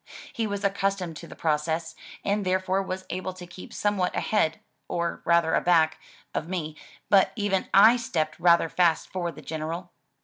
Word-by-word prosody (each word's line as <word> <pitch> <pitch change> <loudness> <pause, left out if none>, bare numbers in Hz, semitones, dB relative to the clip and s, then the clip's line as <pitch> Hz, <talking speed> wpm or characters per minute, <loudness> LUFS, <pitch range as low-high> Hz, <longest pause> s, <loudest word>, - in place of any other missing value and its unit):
He 230 -5 -1
was 205 0 -4
accustomed 195 -3 -1
to 170 - -10
the - - -11
process, 160 +1 -1 0.3
and 205 +1 +1
therefore 185 +1 +1
was 185 -1 -5
able 185 +1 -3
to 180 -1 -10
keep 175 +1 -11
somewhat 205 -3 0
ahead 160 -7 +1 0.3
(or 170 0 -2
rather 170 -1 +3
aback) 165 -3 +3 0.3
of 160 - -3
me, 160 -5 -3 0.3
but 195 -2 +5
even 205 -4 -1 0.2
/ 240 +2 +5
stepped 160 -9 -2
rather 170 -1 +5
fast 170 -1 +1
for 175 -2 -2
the 145 - -13
General. 165 +3 -5
180 Hz, 165 wpm, -26 LUFS, 165-195 Hz, 0.3 s, but